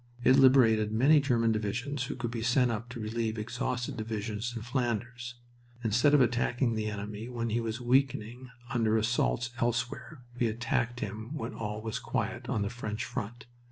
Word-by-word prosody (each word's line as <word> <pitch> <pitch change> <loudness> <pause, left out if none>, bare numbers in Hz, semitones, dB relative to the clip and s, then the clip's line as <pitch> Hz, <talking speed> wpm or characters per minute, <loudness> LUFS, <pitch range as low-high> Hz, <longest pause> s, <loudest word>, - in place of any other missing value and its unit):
It 130 - +6
liberated 125 -6 +5
many 135 +8 +5
German 120 -5 +2
divisions 125 +6 -2
who - - -4
could 120 -2 -3
be 115 -1 -3
sent 125 +1 +3
up 115 +2 -4
to 125 -1 -7
relieve 110 +1 -2
exhausted 125 +3 -3
divisions 110 +1 -3
in 115 - -5
Flanders. 120 0 -2 0.5
Instead 120 +6 +4
of 145 - +5
attacking 120 0 +2
the 110 -1 -1
enemy 105 +2 -5
when 115 -2 -3
he 120 +2 +1
was 115 0 -3
weakening 125 -1 0 0.2
under 110 -2 +2
assaults 120 +2 +1
elsewhere, 120 +4 -2 0.2
we 120 - +3
attacked 120 +1 -1
him 110 +7 -5
when 155 - -4
all 105 -1 -4
was 110 -1 -3
quiet - - -3
on 105 - 0
the 100 - -1
French 115 -1 -4
front. 115 +4 -5
115 Hz, 170 wpm, -30 LUFS, 110-125 Hz, 0.5 s, It